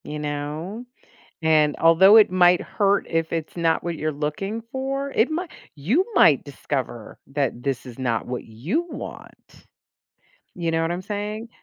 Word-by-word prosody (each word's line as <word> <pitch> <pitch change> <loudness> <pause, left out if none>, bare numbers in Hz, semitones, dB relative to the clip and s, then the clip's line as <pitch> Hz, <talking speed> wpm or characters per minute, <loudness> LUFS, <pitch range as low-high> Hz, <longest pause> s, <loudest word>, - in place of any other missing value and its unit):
You 150 0 -6
know? 150 +9 -5 0.6
And 155 -2 +3
although 180 +6 +7
it 215 -4 +7
might 180 -1 +4
hurt 200 -1 +1
if 165 -1 -1
it's 165 0 -4
not 165 -1 +1
what 170 -1 -3
you're 155 0 -2
looking 155 +10 -3
for, 275 +1 -3
it 245 +2 +2
might 335 +2 -3 0.2
you 215 - +1
might 145 - +5
discover 135 -5 -5
that 135 -3 -2
this 135 -2 -2
is 125 -2 -11
not 120 -4 -1
what 125 -1 -5
you 155 - -3
want. - - -11 0.9
You 170 -3 -3
know 165 0 +1
what 165 - -1
I'm 175 +1 -3
saying? 210 +3 -5
165 Hz, 160 wpm, -23 LUFS, 145-205 Hz, 0.9 s, although